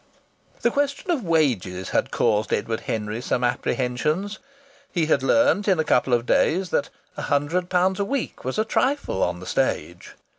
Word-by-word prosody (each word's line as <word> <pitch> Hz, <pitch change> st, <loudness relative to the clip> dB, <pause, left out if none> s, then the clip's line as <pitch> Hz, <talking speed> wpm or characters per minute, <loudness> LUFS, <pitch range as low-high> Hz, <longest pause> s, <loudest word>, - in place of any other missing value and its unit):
The 235 Hz, -, +3 dB
question 285 Hz, +5 st, -1 dB
of 295 Hz, -9 st, 0 dB
wages 125 Hz, -, 0 dB
had -, -, 0 dB
caused 105 Hz, 0 st, +1 dB
Edward 110 Hz, +2 st, -1 dB
Henry 110 Hz, +1 st, -3 dB
some 125 Hz, 0 st, -1 dB
apprehensions. 140 Hz, +11 st, -1 dB, 0.5 s
He 170 Hz, -4 st, +1 dB
had 155 Hz, -4 st, +2 dB
learnt 280 Hz, -, +3 dB
in 190 Hz, -3 st, +4 dB
a 160 Hz, -, +2 dB
couple 125 Hz, -3 st, +2 dB
of 120 Hz, 0 st, -2 dB
days 175 Hz, +7 st, +2 dB
that -, -, 0 dB, 0.3 s
a -, -, -3 dB
hundred 155 Hz, +6 st, 0 dB
pounds 185 Hz, +2 st, +2 dB
a 200 Hz, -, +1 dB
week 270 Hz, +4 st, -3 dB
was 130 Hz, -, -3 dB
a 215 Hz, -, +2 dB
trifle 260 Hz, -, 0 dB
on 90 Hz, 0 st, 0 dB
the 90 Hz, -, -9 dB
stage. -, -, -2 dB
155 Hz, 175 wpm, -24 LUFS, 120-200 Hz, 0.5 s, in